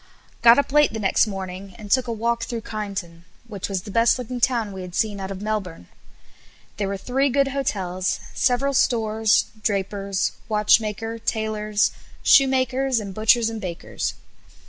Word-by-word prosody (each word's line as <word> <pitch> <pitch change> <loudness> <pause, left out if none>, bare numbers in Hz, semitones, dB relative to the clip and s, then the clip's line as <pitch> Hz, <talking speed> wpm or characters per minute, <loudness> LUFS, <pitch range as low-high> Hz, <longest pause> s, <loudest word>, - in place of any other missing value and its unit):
Got 235 0 +8
up 280 - +1
late 295 -3 +4
the 220 - -3
next 200 +2 +2
morning, 190 -1 -7
and 205 -2 -10
took 255 -1 +3
a - - -2
walk 230 +1 -1
through 235 -2 -4
Kyneton, 195 -6 -6 0.2
which 205 -4 -5
was 190 -2 -2
the 205 - -8
best 230 +4 +3
looking 250 0 -5
town 230 -4 +1
we 190 -1 -7
had 180 -1 -8
seen 210 -3 0
out 190 0 -5
of 195 +1 -6
Melbourne. 195 - -4 0.9
There 200 - -1
were 200 0 -3
three 265 +7 0
good 275 +1 +2
hotels, 190 -9 -2
several 270 +2 +1
stores, 225 -5 +2 0.2
drapers, 200 -1 -1 0.2
watchmaker, 215 +1 +2
tailors, 215 -1 0 0.3
shoemakers, 265 -1 +3
and 200 -3 -6
butchers, 220 +3 +3
and 225 -1 -4
bakers. 175 -4 -4
215 Hz, 160 wpm, -23 LUFS, 195-240 Hz, 0.9 s, Got